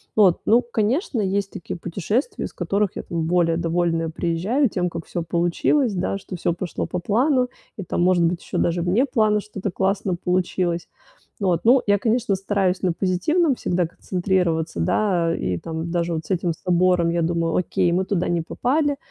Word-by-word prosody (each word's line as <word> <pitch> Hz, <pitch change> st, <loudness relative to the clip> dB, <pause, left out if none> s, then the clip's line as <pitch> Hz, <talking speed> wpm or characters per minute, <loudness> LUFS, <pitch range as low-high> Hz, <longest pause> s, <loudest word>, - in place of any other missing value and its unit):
Вот, 195 Hz, -5 st, +4 dB
ну 235 Hz, +3 st, +5 dB
конечно, 240 Hz, -, -1 dB
есть 195 Hz, 0 st, -1 dB
такие 160 Hz, -, -6 dB
путешествия, 200 Hz, -, -2 dB
из -, -, -8 dB
которых 200 Hz, -1 st, 0 dB
я, -, -, -5 dB
там, 165 Hz, -1 st, -3 dB
более 165 Hz, -1 st, +2 dB
довольная 165 Hz, -1 st, 0 dB
приезжаю 180 Hz, -, 0 dB
тем, 180 Hz, -2 st, -1 dB
как 170 Hz, 0 st, -7 dB
всё 175 Hz, -, -4 dB
получилось, 175 Hz, -, +1 dB
да, 190 Hz, +1 st, -1 dB
что 190 Hz, -1 st, -8 dB
всё 175 Hz, 0 st, 0 dB
пошло 175 Hz, 0 st, -4 dB
по 180 Hz, -, -3 dB
плану 250 Hz, -, +2 dB, 0.3 s
и, 200 Hz, -, -4 dB
там, 175 Hz, -, -2 dB
может 180 Hz, -1 st, +3 dB
быть, 170 Hz, +1 st, 0 dB
еще -, -, -5 dB
даже 170 Hz, 0 st, +1 dB
вне 185 Hz, +10 st, +2 dB
плана 215 Hz, -5 st, +2 dB
что-то 200 Hz, -2 st, -5 dB
классно 190 Hz, 0 st, 0 dB
получилось. 180 Hz, -1 st, -1 dB, 0.5 s
Вот, 185 Hz, -5 st, +1 dB
ну 250 Hz, +3 st, +6 dB
я, 205 Hz, 0 st, +4 dB
конечно, 225 Hz, 0 st, +1 dB
стараюсь 195 Hz, -1 st, 0 dB
на 180 Hz, -2 st, +2 dB
позитивном 260 Hz, -, +1 dB
всегда 180 Hz, -6 st, 0 dB
концентрироваться, 175 Hz, -, -1 dB
да, 170 Hz, -, +1 dB
и 90 Hz, -, -2 dB
там 165 Hz, -, -5 dB
даже 170 Hz, -1 st, 0 dB
вот 160 Hz, -1 st, -3 dB
с -, -, -7 dB
этим 175 Hz, -2 st, 0 dB
собором 180 Hz, 0 st, +2 dB
я 170 Hz, 0 st, 0 dB
думаю: 165 Hz, 0 st, 0 dB
"Окей, 175 Hz, -1 st, +1 dB
мы 185 Hz, +2 st, +1 dB
туда 185 Hz, -3 st, -1 dB
не 175 Hz, -1 st, +1 dB
попали, 285 Hz, -, 0 dB
180 Hz, 180 wpm, -22 LUFS, 170-210 Hz, 0.5 s, ну